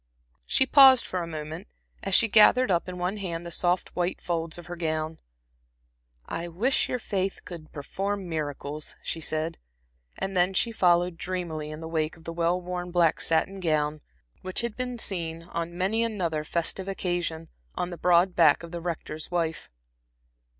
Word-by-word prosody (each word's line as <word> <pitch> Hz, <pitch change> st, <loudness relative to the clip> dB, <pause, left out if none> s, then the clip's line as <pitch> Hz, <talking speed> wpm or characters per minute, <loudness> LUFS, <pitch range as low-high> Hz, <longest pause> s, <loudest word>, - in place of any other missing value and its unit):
She 265 Hz, -, +4 dB
paused 265 Hz, -2 st, +8 dB
for 185 Hz, -, -2 dB
a 170 Hz, -, -4 dB
moment, 160 Hz, +3 st, -6 dB, 0.3 s
as 195 Hz, -1 st, +1 dB
she 230 Hz, -, +6 dB
gathered 220 Hz, +2 st, +6 dB
up 175 Hz, +1 st, +1 dB
in 180 Hz, -, -6 dB
one 180 Hz, +3 st, -2 dB
hand 175 Hz, -4 st, -4 dB
the 170 Hz, -, -6 dB
soft 175 Hz, +1 st, 0 dB
white 175 Hz, +1 st, -1 dB
folds 165 Hz, -1 st, -3 dB
of 175 Hz, -, -10 dB
her 175 Hz, +1 st, -6 dB
gown. 160 Hz, -1 st, -2 dB, 1.1 s
"I 170 Hz, +1 st, -4 dB
wish 215 Hz, +11 st, +1 dB
your 250 Hz, -, 0 dB
faith 195 Hz, -4 st, -2 dB
could 165 Hz, -3 st, -9 dB
perform 195 Hz, +6 st, -3 dB
miracles," 150 Hz, -2 st, -4 dB
she 165 Hz, -, -4 dB
said. 155 Hz, +1 st, -2 dB, 0.6 s
And 195 Hz, 0 st, -3 dB
then 180 Hz, +1 st, +2 dB
she 230 Hz, -, +2 dB
followed 175 Hz, -4 st, +3 dB
dreamily 170 Hz, -4 st, -4 dB
in 155 Hz, +1 st, -7 dB
the 160 Hz, -, -5 dB
wake 160 Hz, 0 st, -1 dB
of 165 Hz, -, -17 dB
the 165 Hz, -, -6 dB
well 170 Hz, +1 st, +1 dB
worn 180 Hz, 0 st, -5 dB
black 170 Hz, -2 st, +2 dB
satin 165 Hz, +4 st, +1 dB
gown, 155 Hz, -3 st, 0 dB, 0.4 s
which 185 Hz, 0 st, 0 dB
had 235 Hz, -2 st, -3 dB
been 250 Hz, -1 st, -3 dB
seen, 165 Hz, -6 st, -2 dB
on 170 Hz, 0 st, -5 dB
many 205 Hz, +5 st, +1 dB
another 175 Hz, -9 st, -1 dB
festive 170 Hz, +4 st, -1 dB
occasion, 175 Hz, -4 st, -2 dB, 0.3 s
on 180 Hz, -, -2 dB
the -, -, -4 dB
broad 180 Hz, +1 st, +4 dB
back 160 Hz, -2 st, +5 dB
of 170 Hz, -, -9 dB
the 170 Hz, -1 st, -5 dB
Rector's 160 Hz, -2 st, -5 dB
wife. 165 Hz, -2 st, -2 dB
175 Hz, 175 wpm, -27 LUFS, 160-190 Hz, 1.1 s, paused